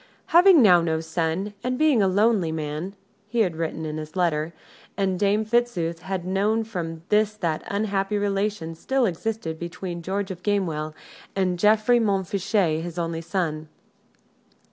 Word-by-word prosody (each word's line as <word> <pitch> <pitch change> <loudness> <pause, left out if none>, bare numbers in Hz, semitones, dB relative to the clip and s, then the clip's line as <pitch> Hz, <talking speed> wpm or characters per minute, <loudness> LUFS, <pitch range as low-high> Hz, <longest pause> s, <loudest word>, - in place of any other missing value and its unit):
"Having 350 -4 +8
now 180 -5 +7
no 160 -1 0
son, 165 +5 -2
and 250 0 -1
being 300 -6 +4
a 195 - +4
lonely 200 -3 +2
man," 155 +4 -4 0.3
he 235 +1 0
had 180 -6 +1
written 160 0 -3
in 155 0 -4
his 155 +2 -7
letter, 165 -3 0 0.5
and 190 -2 0
Dame 205 +2 +2
Fitzooth 215 -8 0
had 185 0 -4
known 205 +4 +1
from 165 -7 -5
this 215 0 +3
that 165 -6 -2
unhappy 200 0 -1
relations 200 -5 -2
still 265 -2 +1
existed 185 -3 -3
between 170 0 -5
George 195 +3 -3
of 180 -1 -8
Gamewell 165 -7 -1 0.4
and 185 -2 0
Geoffrey 215 +4 +4
Montfichet, 195 -4 0
his 175 0 -7
only 165 -1 -2
son. 160 -3 -2
190 Hz, 150 wpm, -24 LUFS, 165-210 Hz, 0.5 s, Having